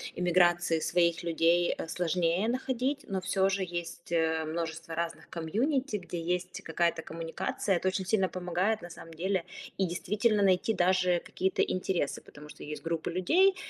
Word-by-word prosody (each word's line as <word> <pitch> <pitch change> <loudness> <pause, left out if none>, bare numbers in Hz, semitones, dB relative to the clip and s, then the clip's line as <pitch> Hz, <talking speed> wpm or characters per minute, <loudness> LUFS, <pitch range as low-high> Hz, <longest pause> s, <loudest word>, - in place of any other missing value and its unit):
эмиграции 175 -2 +3
своих 170 +1 +2
людей, 170 +1 +2
э, - - -5
сложнее 175 +3 +1
находить. 260 +3 -1
Но 190 -1 -2
всё 190 +1 +2
же 195 0 0
есть, 175 -1 -6
э, 160 -1 +2
множество 165 0 -4
разных 170 0 -4
комьюнити, 230 - 0
где 175 -2 -6
есть 180 +2 -2
какая-то 165 0 0
коммуникация. 165 +4 -2
Это 175 - -1
очень 190 0 -3
сильно 195 -2 +3
помогает, 185 +4 -1
на 175 - -8
самом 165 -1 -11
деле. 185 +2 -1 0.3
И 195 - +2
действительно 205 +5 +1
найти 195 +3 +3
даже 180 -2 +3
какие-то 190 +1 -1
интересы, 185 -5 -1
потому 150 0 -13
что - - -11
есть 150 +1 -6
группы 165 -1 -2
людей, 350 - +4
175 Hz, 160 wpm, -30 LUFS, 165-190 Hz, 0.3 s, людей